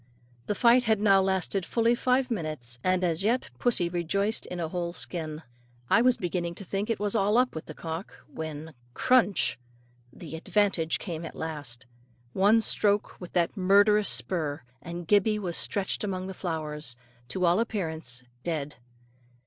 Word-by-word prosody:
The 210 - 0
fight 245 +2 +5
had 220 -2 +2
now 195 -2 +5
lasted 190 0 0
fully 230 +6 +2
five 255 +1 +1
minutes, 155 - +1
and 185 0 +1
as 170 0 +1
yet 235 - 0
pussy 220 -8 +1
rejoiced 180 +5 -1
in 180 - -6
a 165 - -1
whole 175 0 -3
skin. 160 -3 -4 0.5
I 230 - +6
was 250 0 +4
beginning 175 -1 -3
to 200 - -8
think 195 +4 -3
it 230 - 0
was 205 -1 -1
all 210 +1 +3
up 250 0 +3
with 160 - -7
the 155 - -8
cock, 165 +3 -6
when, 160 0 -7 0.2
crunch! 240 - +3 0.5
the 160 +2 -9
advantage 170 -2 +1
came 170 -4 -6
at 165 - -8
last, 145 -6 -5 0.5
one 210 +4 +4
stroke 205 -2 0
with 180 - -9
that 175 +1 +1
murderous 205 +2 +4
spur, 155 -6 0 0.2
and 170 0 -7
Gibbey 210 +2 +3
was 180 -5 -3
stretched 200 0 +1
among 185 -2 -3
the 190 - -6
flowers, 150 -7 -4 0.3
to 180 +8 -1
all 175 +3 +3
appearance 160 - -2 0.2
dead. 150 -3 -4
185 Hz, 165 wpm, -27 LUFS, 160-210 Hz, 0.5 s, I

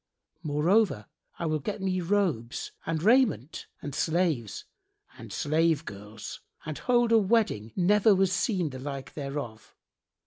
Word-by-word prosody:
Moreover, 160 - +2 0.3
I 170 - -3
will 155 -1 0
get 200 +9 -4
me 185 -1 -1
robes 170 - -1 0.2
and 160 -1 -1
raiment 220 - +2 0.2
and 145 - -5
slaves 160 - 0 0.5
and - - -11
slave 160 +1 +1
girls 105 +2 -8 0.2
and 155 -1 -4
hold 240 -2 +2
a 225 - +7
wedding 195 - +1
never 205 +3 +4
was 190 -1 +2
seen 180 - 0
the 130 - -7
like 135 0 -6
thereof. 140 -6 -6
165 Hz, 135 wpm, -28 LUFS, 135-195 Hz, 0.5 s, a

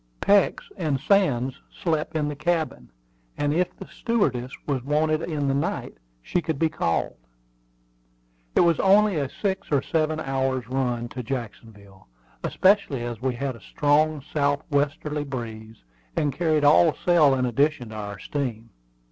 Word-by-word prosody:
Peeks 200 0 +3
and 155 -7 0
Sands 135 -7 +2 0.3
slept 160 -3 -1
in 150 -2 0
the 150 - -3
cabin; 160 - -2 0.5
and 145 0 0
if 180 +2 0
the 190 - -8
stewardess 140 - -1
was 135 -4 -1
wanted 155 +2 +1
in 150 -4 -2
the 135 - +2
night, 140 - -2 0.3
she 180 - 0
could 160 -2 -2
be 160 +2 +2
called. 85 - -1 1.4
It - - +6
was 170 -3 +3
only 200 -1 +4
a 140 -3 -1
six 190 +2 -3
or 140 -2 +2
seven 155 -1 0
hours' 135 -4 -1
run 125 -2 -1
to 125 - -6
Jacksonville, 110 - -8 0.4
especially 185 - +2
as 120 -2 -5
we 130 -1 -1
had 135 +1 -3
a 115 - -14
strong 150 +4 +1
south 145 -1 +1
westerly 145 +1 0
breeze, 115 - -7 0.3
and 145 -2 0
carried 155 0 +1
all 150 +2 +6
sail 155 -6 +5
in 130 -1 0
addition 130 0 +1
to 110 - -9
our 105 -1 -5
steam. 115 -2 -4
145 Hz, 155 wpm, -25 LUFS, 125-155 Hz, 1.4 s, It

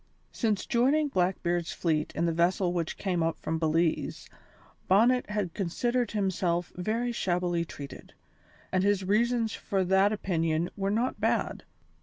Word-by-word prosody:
Since 215 -5 -1
joining 285 +6 +2
Blackbeard's 175 -4 0
fleet 155 -3 0
in 170 - +1
the 170 - +2
vessel 175 +2 +1
which 170 -2 -2
came 180 -4 -1
up 165 0 0
from 160 0 -3
Belize, 165 +1 0 0.6
Bonnet 235 +6 +4
had 210 -5 -2
considered 240 +6 -1
himself 180 -4 0
very 225 +7 -1
shabbily 175 -5 0
treated, 140 -3 -10 0.6
and 185 0 +2
his 200 -1 +2
reasons 225 +3 +1
for 195 -1 -1
that 190 +2 +3
opinion 170 -5 0
were 195 -1 -1
not 230 +5 -1
bad. - - 0
190 Hz, 140 wpm, -28 LUFS, 170-215 Hz, 0.6 s, Bonnet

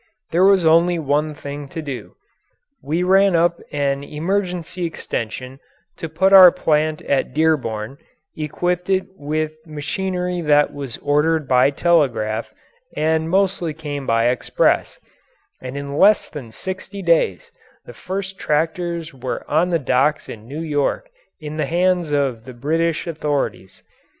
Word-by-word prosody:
There 175 +3 +3
was 195 -3 +5
only 170 +2 +4
one 150 0 0
thing 145 -1 -7
to 160 - -7
do. 140 -5 -7 0.7
We 160 +5 -1
ran 195 0 +4
up 170 +1 +2
an 140 -1 -1
emergency 180 +3 -3
extension 130 -5 -5 0.4
to 165 - -5 0.3
our 185 -2 +11
plant 155 -1 0
at 135 -1 -1
Dearborn, 135 -6 0 0.4
equipped 175 +4 -2
it 190 -1 +2
with 155 0 -2
machinery 180 +4 -3
that 150 -2 +3
was 140 -5 -6
ordered 150 +1 +1
by 125 +1 +4
telegraph 135 -9 +1 0.5
and 160 +1 +1
mostly 185 -4 0
came 145 -3 -6
by 115 +1 +3
express, 125 - +1 0.6
and 130 +2 -6
in 140 0 -5
less 205 +7 +4
than 130 -7 -9
sixty 190 - -7
days 165 - +1 0.3
the 120 - -11
first 190 +6 -5
tractors 165 +1 -1
were 130 -1 -5
on 160 +4 +2
the 170 - +2
docks 140 +1 +1
in 110 0 -10
New 145 +5 -6
York 155 - -1 0.3
in 155 -1 -7
the 150 -3 -1
hands 175 0 +1
of 135 -6 0
the 130 - -9
British 160 +6 -1
authorities. 150 - -3
155 Hz, 135 wpm, -20 LUFS, 140-175 Hz, 0.7 s, our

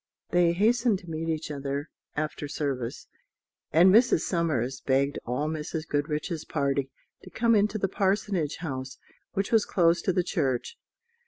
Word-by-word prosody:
They 175 -1 +4
hastened 225 +3 +3
to 180 -3 -13
meet 165 +1 -3
each 160 -1 -2
other 140 +1 -4 0.2
after 150 -1 -3
service; 135 -5 -3 0.7
and 180 +4 +6
Mrs. 230 -6 +5
Somers 135 -7 -1
begged 140 +1 +1
all 130 +5 -1
Mrs. 155 +1 -4
Goodriche's 150 +3 -2
party 140 -2 -1 0.3
to - - -12
come 235 0 +2
into 210 0 +2
the 195 - 0
Parsonage 190 -5 0
House, 130 -5 -5 0.4
which 195 -1 -1
was 225 -2 +5
close 170 -1 +2
to 185 - +1
the 180 0 +1
church. 140 - -1
160 Hz, 150 wpm, -27 LUFS, 140-190 Hz, 0.7 s, and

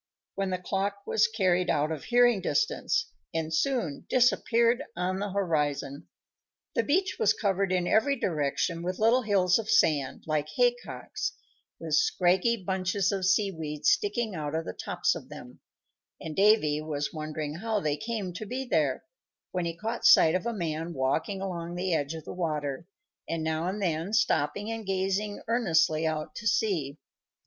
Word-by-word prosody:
when 195 -1 -2
the 185 - -1
clock 200 +2 -3
was 215 - +3
carried 185 -5 +1
out 150 +1 +1
of 155 -3 -5
hearing 240 -4 +4
distance, 455 - 0 0.2
and 160 0 -2
soon 200 - 0
disappeared 240 -1 +3
on 185 +2 -1
the 205 +1 -2
horizon. 150 -7 -1 0.7
The - - +2
beach 370 +7 0
was 450 - +4
covered 195 -2 0
in 180 -1 +1
every 220 +9 +3
direction 165 0 -1
with 180 +2 -3
little 230 +4 +4
hills 195 -4 +3
of 220 -1 -5
sand, 150 -11 +2
like 155 -1 -1
haycocks, - - -1 0.5
with - - -5
scraggy 230 - +3
bunches 190 +1 0
of 190 -2 -1
sea 195 +1 +3
weed 150 -3 -6
sticking 210 +1 +2
out 150 -2 -4
of 160 - -2
the - - -5
tops - - -1
of - - -9
them; - - -11 0.6
and 155 -1 -6
Davy 195 -8 +4
was 150 -2 -3
wondering 155 -1 -4
how 220 +2 -1
they 150 -6 0
came 215 -1 -4
to 215 - -6
be 260 +4 -3
there, 155 - 0 0.5
when 180 -2 -2
he 170 0 -4
caught 225 +5 -4
sight 225 - +7
of 185 +5 -1
a - - 0
man 165 -4 -3
walking 150 +9 -1
along 175 -3 -4
the 180 0 -1
edge 145 0 -1
of 160 -1 -8
the - - -6
water, 155 -3 -3 0.4
and 165 -1 -2
now 160 +1 -1
and 195 +3 -3
then 175 0 -1
stopping 205 -1 +1
and 225 -3 -6
gazing 195 +2 -1
earnestly 165 -9 +2
out 155 0 -3
to 215 - -4
sea. 165 -10 0
185 Hz, 170 wpm, -28 LUFS, 160-215 Hz, 0.7 s, sight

